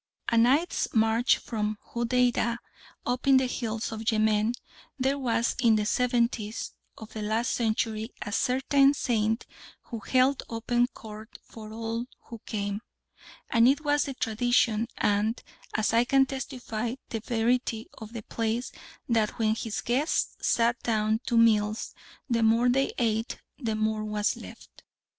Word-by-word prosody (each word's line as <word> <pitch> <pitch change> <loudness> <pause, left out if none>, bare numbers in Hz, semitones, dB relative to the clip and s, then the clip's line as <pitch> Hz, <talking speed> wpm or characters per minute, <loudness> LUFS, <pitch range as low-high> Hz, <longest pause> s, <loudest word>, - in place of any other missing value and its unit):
A 235 - +1
night's 260 +9 +3
march 225 +2 +4
from 215 -2 -3 0.2
Hodeidah, 235 0 +1 0.5
up 250 +2 -2
in 270 -1 +7
the 260 - +3
hills 225 -3 -3
of 220 +1 -1
Yemen, 215 +1 +2 0.4
there 270 +1 0
was 235 -2 0
in 230 -3 +5
the 210 -1 +1
seventies 235 -2 0 0.3
of 220 - -11
the 220 - -5
last 220 +3 0
century 220 0 -1
a 205 - -6
certain 275 +4 +3
saint 225 -3 0 0.4
who 230 - -6
held 260 +5 +2
open 240 +1 +1
court 220 -3 -11
for 215 -1 -11
all 230 +1 -3 0.2
who 230 - -10
came, 205 -1 -3 0.7
and 230 0 +5
it 280 +3 +3
was 290 0 +2
the 275 -2 -5
tradition, 230 -1 +1
and, 210 +3 +1 0.3
as 215 0 +1
I 230 +1 +5
can 270 +1 +4
testify, 250 -4 -4
the 225 - -3
verity 230 0 0
of 220 +1 -9
the 230 -2 -6
place 230 +3 -2 0.4
that 225 -3 +1
when 220 -1 +2
his 225 -1 -3
guests 265 +7 0
sat 235 +1 +2
down 220 -1 +1
to 235 - +2
meals 215 -1 +3 0.3
the 235 -3 +1
more 230 +2 +4
they 270 +2 +2
ate 225 -1 -1 0.2
the 225 -5 -1
more 215 0 0
was 210 0 0
left. - - -13
230 Hz, 150 wpm, -28 LUFS, 220-245 Hz, 0.7 s, in